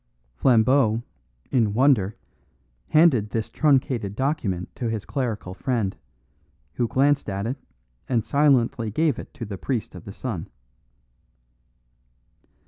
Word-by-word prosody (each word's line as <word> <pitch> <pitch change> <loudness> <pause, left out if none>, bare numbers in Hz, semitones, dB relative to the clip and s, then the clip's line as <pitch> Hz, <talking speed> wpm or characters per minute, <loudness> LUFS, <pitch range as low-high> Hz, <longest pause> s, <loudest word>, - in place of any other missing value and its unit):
Flambeau, 115 - +3 0.5
in 110 -5 +2
wonder, 115 -6 +3 0.7
handed 150 -10 +4
this 110 0 -3
truncated 130 -8 +1
testament 130 - -1
to 120 - -2
his 110 -2 -3
clerical 115 -9 -3
friend, 115 -3 -1 0.8
who 120 - 0
glanced 140 0 +2
at 100 +1 -3
it 125 +5 -2 0.5
and 115 -4 +1
silently 130 -6 +2
gave 150 +4 +1
it - - -9
to 125 -5 -5
the 100 -3 -7
priest 125 -6 -3
of 90 - -11
the 100 - -7
sun. 100 -5 -5
115 Hz, 120 wpm, -24 LUFS, 105-135 Hz, 0.8 s, handed